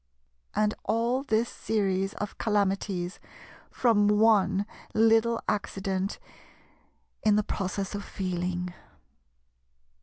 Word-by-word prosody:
And 215 0 +2
all 235 +4 +1
this 230 -3 +1
series 195 -4 -1
of 210 - -5
calamities 195 -4 0 0.5
from 220 -4 +3
one 210 -2 +4 0.3
little 225 +1 +4
accident 195 -1 -1 1.0
in 215 -1 +4
the 210 - +3
process 195 0 -3
of 205 0 -4
Feeling. 180 -1 -3
205 Hz, 90 wpm, -28 LUFS, 190-220 Hz, 1.0 s, one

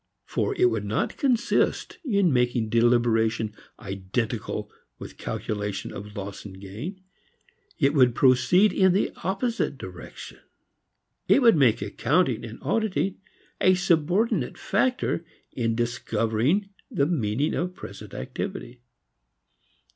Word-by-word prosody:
For 410 - -1
it 370 - +3
would - - -2
not - - -1
consist 250 -6 +1
in 200 - +2
making 120 -2 +1
deliberation 115 -1 +2 0.3
identical 100 +3 -3 0.3
with - - -10
calculation 105 -2 -4
of 105 +1 -8
loss 100 0 -6
and 95 -2 -10
gain; 115 - -7 0.8
it 140 -2 +3
would 125 -5 +4
proceed 130 - +4
in 190 -1 +4
the 195 - +1
opposite 225 +5 -1
direction. - - -10 0.9
It 275 - +5
would 230 -5 +7
make 125 -9 +3
accounting 125 - +1
and 115 0 -8
auditing 205 -3 0 0.4
a 185 0 +5
subordinate 180 - +1
factor 245 -4 0 0.3
in 115 -2 -1
discovering 120 - 0 0.2
the 140 - +1
meaning 140 -3 0
of 180 +1 -2
present - - -10
activity. 120 0 -6
125 Hz, 115 wpm, -26 LUFS, 115-185 Hz, 0.9 s, would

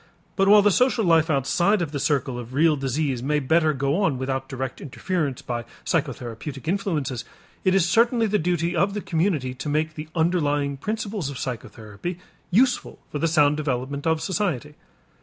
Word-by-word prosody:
But 195 0 +2
while 205 0 +7
the 205 - +5
social 245 0 +2
life 165 -1 +4
outside 175 +8 +2
of 165 -4 -2
the 145 - -3
circle 135 -3 0
of 120 +2 -8
real 155 +1 +4
disease 135 -1 -1
may 150 +4 +1
better 155 +3 +3
go 140 +5 0
on 160 -10 +1
without 130 0 -3
direct 130 -1 -5
interference 145 -1 -3
by 120 -1 -3 0.2
psychotherapeutic 135 -2 -3
influences, 160 - -1 0.4
it 185 0 +3
is 185 -3 +3
certainly 230 +5 +3
the 210 -1 +1
duty 175 0 0
of 195 +4 +1
the 210 - -2
community 160 -8 0
to 135 +3 -5
make 155 +2 0
the 150 0 -7
underlying 145 -4 +1
principles 210 -2 -3
of 140 - -6
psychotherapy 120 - -6 0.3
useful 245 +7 +2
for 145 - -3
the 165 - +2
sound 150 -2 +3
development 140 0 -2
of 160 -1 +1
society. 170 - -2
155 Hz, 175 wpm, -24 LUFS, 135-180 Hz, 0.4 s, while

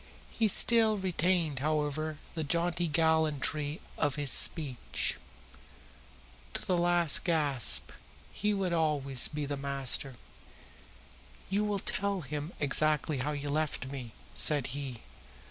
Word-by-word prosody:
He 225 - +1
still 220 +1 +5
retained, 175 -5 0
however, 155 +1 -2 0.2
the 160 - -3
jaunty 170 +2 -1
gallantry 155 -1 0 0.2
of 145 -3 0
his 145 -3 +1
speech. 140 -7 +2 1.4
To - - -2
the 185 - 0
last 175 -2 +3
gasp 145 - +1 0.4
he 210 +1 -1
would 195 -3 -1
always 145 -6 +1
be 150 -1 -5
the 140 0 -4
master. 135 -1 +1 1.4
"You 205 +2 +1
will 210 -1 -1
tell 200 0 -2
him 150 +2 -6
exactly 150 0 +1
how 145 +4 -2
you 145 -1 -6
have 145 - -4
left 155 -3 -2
me," 125 -5 -8 0.2
said 145 -4 +4
he. 135 -5 -6
155 Hz, 125 wpm, -30 LUFS, 140-175 Hz, 1.4 s, still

